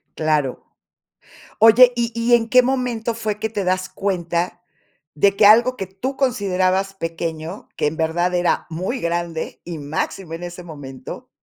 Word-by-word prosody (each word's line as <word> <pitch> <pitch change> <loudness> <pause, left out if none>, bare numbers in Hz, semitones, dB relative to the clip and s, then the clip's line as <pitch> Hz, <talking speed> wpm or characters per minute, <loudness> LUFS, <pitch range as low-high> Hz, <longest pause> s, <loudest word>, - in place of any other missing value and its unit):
Claro. 150 -4 0 0.9
Oye, 235 +3 +8
¿y 235 -1 -1
y 235 +1 +1
en 230 -1 0
qué 250 0 +7
momento 245 -3 -1
fue 215 -2 -3
que 220 - -2
te 205 -3 -3
das 185 0 0
cuenta, 175 -2 -2 0.5
de 200 +6 +3
que 205 - +4
algo 240 +4 +6
que 195 - -4
tú 255 +9 -5
considerabas 195 -6 +1
pequeño, 165 0 -5
que - - +1
en 155 - -3
verdad 175 +3 0
era 175 0 +1
muy 185 +10 -3
grande 170 -1 -3
y 170 -2 -6
máximo 160 +4 -4
en 170 +2 -6
ese 175 0 -7
momento, 135 -5 -9
185 Hz, 160 wpm, -21 LUFS, 165-225 Hz, 0.9 s, Oye